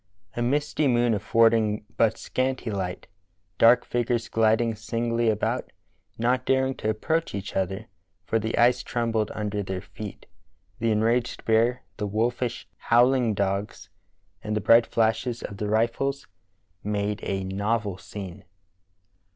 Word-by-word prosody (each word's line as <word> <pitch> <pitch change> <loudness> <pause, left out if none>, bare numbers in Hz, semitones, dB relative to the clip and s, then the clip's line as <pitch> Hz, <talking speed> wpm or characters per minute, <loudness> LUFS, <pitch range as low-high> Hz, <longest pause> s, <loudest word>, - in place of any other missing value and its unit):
A 120 - -2
misty 145 +4 +1
moon 120 -2 +3
affording 110 0 +2
but 110 -1 +2
scanty 130 -3 -2
light, 95 -3 -4 0.5
dark 120 +1 +6
figures 120 -1 -1
gliding 115 +1 +2
singly 115 +1 -1
about, 105 -1 -1 0.5
not 125 +2 +1
daring 130 0 +2
to 110 - -2
approach 160 +9 -1
each 100 0 -6
other, 95 +3 -2 0.4
for 115 - +1
the 110 +1 -2
ice 120 +1 +4
trembled 115 -3 -1
under 105 -1 -2
their 95 -1 -4
feet, 105 +1 -9 0.5
the 115 - +1
enraged 115 +3 0
bear, 115 +2 +2
the 105 - -2
wolfish, 120 +3 -1
howling 120 -1 +3
dogs, 100 +1 -2 0.5
and 105 0 -2
the - - +1
bright 115 +3 +5
flashes 115 +2 0
of 100 - -6
the 105 +1 -3
rifles 120 +6 0 0.6
made 105 0 -1
a 95 -1 -2
novel 100 +1 -1
scene." 95 0 -8
115 Hz, 135 wpm, -26 LUFS, 105-120 Hz, 0.6 s, dark